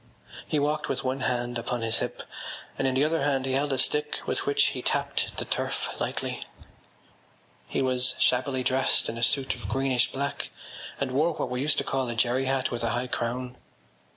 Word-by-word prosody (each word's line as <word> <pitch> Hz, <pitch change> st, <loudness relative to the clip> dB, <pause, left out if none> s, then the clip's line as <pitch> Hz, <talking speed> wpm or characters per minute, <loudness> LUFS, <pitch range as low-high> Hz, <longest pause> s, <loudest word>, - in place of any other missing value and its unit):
He 155 Hz, -, +1 dB
walked 150 Hz, +1 st, +1 dB
with 130 Hz, -, -1 dB
one 130 Hz, +1 st, 0 dB
hand 120 Hz, -2 st, 0 dB
upon 120 Hz, +1 st, -2 dB
his 115 Hz, 0 st, +2 dB
hip -, -, -3 dB, 0.5 s
and 135 Hz, -, +1 dB
in 130 Hz, -, +1 dB
the 135 Hz, +3 st, +4 dB
other 160 Hz, 0 st, +1 dB
hand 135 Hz, -2 st, +1 dB
he 135 Hz, -, -1 dB
held 140 Hz, +2 st, +1 dB
a 135 Hz, -, +1 dB
stick 150 Hz, +3 st, +1 dB
with -, -, -1 dB
which 145 Hz, 0 st, +4 dB
he 125 Hz, -, -4 dB
tapped -, -, 0 dB
the -, -, -1 dB
turf -, -, -1 dB
lightly. -, -, -2 dB, 1.2 s
He -, -, 0 dB
was 130 Hz, -1 st, +2 dB
shabbily 130 Hz, +1 st, +2 dB
dressed 130 Hz, +1 st, +2 dB
in 115 Hz, -, -4 dB
a -, -, -5 dB
suit 135 Hz, +3 st, +2 dB
of 125 Hz, -, -7 dB
greenish 130 Hz, -2 st, +2 dB
black 140 Hz, +1 st, -2 dB, 0.5 s
and 140 Hz, -2 st, -1 dB
wore 155 Hz, +6 st, +3 dB
what -, -, -3 dB
we 125 Hz, 0 st, -1 dB
used 145 Hz, +1 st, +3 dB
to -, -, +2 dB
call 130 Hz, -2 st, -1 dB
a 120 Hz, -, -2 dB
jerry 125 Hz, +3 st, +2 dB
hat 130 Hz, 0 st, +1 dB
with 120 Hz, -, -2 dB
a 115 Hz, -, +1 dB
high 120 Hz, +3 st, 0 dB
crown. 125 Hz, +1 st, -2 dB
130 Hz, 205 wpm, -28 LUFS, 125-140 Hz, 1.2 s, the